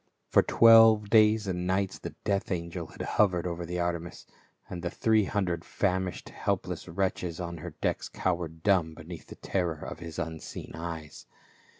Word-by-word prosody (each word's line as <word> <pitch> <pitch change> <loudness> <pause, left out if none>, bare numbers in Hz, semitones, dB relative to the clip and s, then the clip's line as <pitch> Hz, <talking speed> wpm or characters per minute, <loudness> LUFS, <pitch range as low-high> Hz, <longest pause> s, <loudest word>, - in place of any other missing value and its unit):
For - - +7
twelve 115 -2 +6
days 110 -1 +5
and 90 -2 -2
nights 95 +1 0
the - - -7
death 100 -1 -1
angel 85 -1 -3
had - - -8
hov 100 -3 +3
ered 85 -1 -2
over 85 -1 -4
the 90 +1 -3
Artemis, 85 -1 -3 0.4
and 90 -1 -6
the 85 - -2
three 110 +2 +2
hundred 90 -5 -1
famish 95 -1 -1
ing - - -12
helpless - - -2
wretches 90 -1 -2
on 85 -1 -4
her 75 - -8
decks - - -1
cowered 85 -3 -2
dumb 90 -6 +2
beneath 80 +1 -10
the - - -10
terror 85 -5 -2
of - - -7
his 85 -2 -8
unseen 80 0 -6
eyes. 80 -3 -7
90 Hz, 175 wpm, -29 LUFS, 85-100 Hz, 0.4 s, For